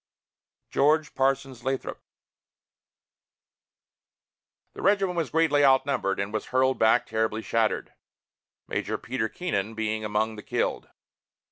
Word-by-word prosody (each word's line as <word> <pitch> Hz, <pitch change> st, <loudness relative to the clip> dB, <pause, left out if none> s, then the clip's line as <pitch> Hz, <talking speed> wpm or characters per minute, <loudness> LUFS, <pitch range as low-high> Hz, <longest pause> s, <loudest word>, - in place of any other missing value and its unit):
GEORGE 150 Hz, +2 st, +2 dB
PARSONS 135 Hz, -1 st, 0 dB
LATHROP. 135 Hz, 0 st, -3 dB, 2.7 s
The -, -, -9 dB
regiment 195 Hz, -2 st, +2 dB
was 165 Hz, -5 st, -1 dB
greatly 160 Hz, -3 st, +3 dB
outnumbered, 130 Hz, -7 st, +2 dB
and 100 Hz, +2 st, -3 dB
was 110 Hz, -, -3 dB
hurled 130 Hz, +1 st, +2 dB
back 115 Hz, +2 st, +4 dB
terribly 110 Hz, 0 st, -1 dB
shattered, 115 Hz, -1 st, 0 dB, 0.7 s
Major -, -, -2 dB
Peter 115 Hz, -4 st, -3 dB
Keenan 110 Hz, -, -3 dB
being 110 Hz, 0 st, -2 dB
among 110 Hz, +1 st, -1 dB
the -, -, -7 dB
killed. -, -, -2 dB
130 Hz, 110 wpm, -26 LUFS, 110-145 Hz, 2.7 s, back